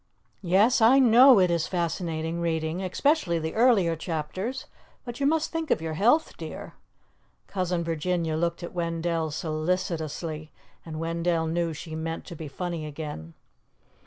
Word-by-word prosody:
Yes, 205 +7 +3
I 235 +5 +7
know 250 -1 +7
it 180 -2 +3
is 170 -2 0
fascinating 170 -1 -2
reading, 160 +1 -1
especially 190 - +1
the 160 0 -3
earlier 220 -8 +4
chapters, 185 - -4 0.4
but 240 0 -7
you 280 - +2
must 320 +1 +1
think 325 -1 -3
of - - +2
your 160 0 -4
health, 240 - +2
dear." - - -8 0.7
Cousin 180 -3 -2
Virginia 165 0 -1
looked 170 +1 -1
at 170 - -7
Wendell 165 -1 -1
solicitously, 155 -1 -3 0.3
and 155 -1 -7
Wendell 165 0 0
knew 165 +1 -1
she 160 +1 -8
meant 165 +1 -4
to 170 - -8
be 160 -1 -7
funny 165 +1 -4
again. 145 - -7
170 Hz, 145 wpm, -26 LUFS, 160-190 Hz, 0.7 s, I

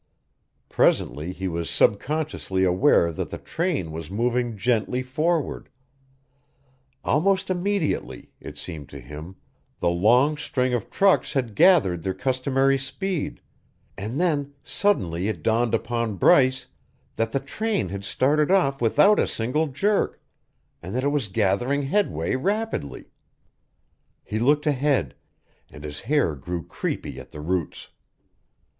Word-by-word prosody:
Presently 75 +5 +1
he 95 +1 -4
was 85 -1 -3
subconsciously 135 -5 0
aware 90 -1 +4
that - - -4
the - - -5
train 160 - -2
was 80 0 -7
moving 120 +2 -1
gently 120 +3 0
forward; 155 +4 -1 1.3
almost 190 +5 +1
immediately, 185 -2 -2
it - - -10
seemed 80 -5 -7
to 70 - -9
him, 75 +8 -9 0.4
the 85 - +1
long 120 +12 +3
string 130 -4 -1
of 120 -4 -2
trucks 195 -1 +2
had 125 -6 -1
gathered 100 - +4
their 95 +2 -3
customary 135 +3 +1
speed; 185 +5 -3 0.5
and 110 +8 -4
then 145 -5 0
suddenly 95 - 0
it 95 -8 -4
dawned 115 +1 +2
upon 115 -2 -2
Bryce 130 +7 +4 0.5
that 115 0 -1
the 135 - 0
train 205 - -2
had 100 +1 -5
started 145 - +1
off 155 -9 +2
without 150 - +4
a - - +2
single 130 +8 -1
jerk 195 +10 0 0.6
and 90 +6 -6
that 130 - 0
it 140 - +2
was 145 -6 -1
gathering 110 +8 +1
headway 135 - 0
rapidly. 200 - -3 1.1
He 110 - -3
looked 145 +6 +2
ahead 140 - +1 0.6
and 75 - -12
his 75 -1 -6
hair 145 - +1
grew 85 +5 -5
creepy 65 - -4
at 65 - -11
the 75 - -10
roots. 85 0 -3
125 Hz, 130 wpm, -24 LUFS, 95-150 Hz, 1.3 s, aware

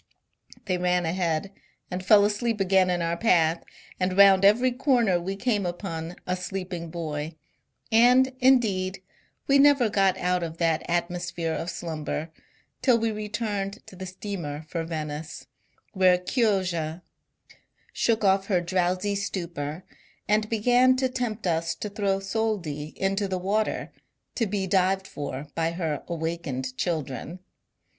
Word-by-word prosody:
They 185 -2 -1
ran 180 -1 +1
ahead, 170 +1 -1 0.4
and 180 +1 -3
fell 205 +1 +6
asleep 210 +1 -1
again 190 -1 +3
in 175 -1 0
our 170 0 0
path, 170 -5 +2 0.4
and 185 0 0
round 195 -1 +7
every 235 +6 +5
corner 240 - +2
we 190 +3 -3
came 210 -1 0
upon 175 -2 -4
a 180 - -1
sleeping 180 -2 -5
bov; 155 -2 -4 0.6
and, 250 +3 +5
indeed, 200 -8 +2 0.4
we 275 0 +4
never 280 -5 +5
got 195 -2 +3
out 180 0 0
of 165 -1 -5
that 165 -2 +1
atmosphere 175 -1 -2
of 165 - -3
slumber 160 -2 -4 0.5
till 250 -3 +4
we 225 0 0
returned 210 -1 -4
to - - -13
the 185 +1 -7
steamer 175 -6 -6
for 165 -2 -2
Venice, 155 -1 -5 0.5
when 180 -2 +3
Chioggia 180 - 0 0.9
shook 225 -2 +1
off 195 0 +3
her 185 -4 +2
drowsy 185 +3 0
stupor, 170 -5 -4 0.4
and 215 +1 +2
began 245 +3 +4
to 260 0 0
tempt 235 -4 -3
us 165 -1 0
to 210 - -5
throw 200 -2 0
soldi 195 -8 -2
into 195 +1 0
the 190 -1 -2
water, 205 +4 -1 0.4
to 230 - 0
be 195 -1 -1
dived 190 +1 +2
for 145 -3 -6
by 165 0 -1
her 160 -5 -2
awakened 160 -6 -3
children. 155 -1 -3
185 Hz, 140 wpm, -26 LUFS, 170-210 Hz, 0.9 s, round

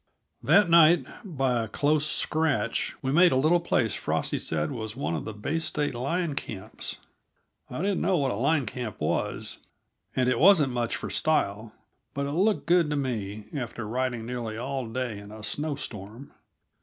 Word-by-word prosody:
That 205 -2 +5
night, 170 0 +6 0.2
by 135 - 0
a 110 - -3
close 150 +7 +1
scratch, 155 -1 0
we 135 - 0
made 175 +4 +6
a - - +2
little 155 +6 +4
place 120 - +1
Frosty - - -1
said 80 -1 -2
was 110 -2 -5
one 130 -10 -2
of 80 - -3
the - - -4
Bay 145 +10 -2
State 150 -2 -1
line 150 +7 -1
camps. 105 -8 -5 0.7
I 125 +8 -4
didn't 200 -1 0
know 190 -2 +2
what 135 -4 +1
a - - -2
line 140 +5 +1
camp 115 -1 -5
was, - - -2 0.6
and 130 -1 +2
it 125 -2 +2
wasn't 160 -7 +6
much 120 -1 -1
for - - -5
style, 110 -8 0 0.4
but 140 0 -1
it 140 - -3
looked 195 +7 +1
good 170 -2 +4
to 150 - 0
me, 110 -7 -3
after 120 -4 -4
riding 120 0 -2
nearly 115 -2 -4
all 130 +1 -3
day 120 -2 -3
in 100 0 -11
a 110 0 -10
snow 145 +7 -2
storm. 110 0 -8
130 Hz, 180 wpm, -27 LUFS, 115-155 Hz, 0.7 s, night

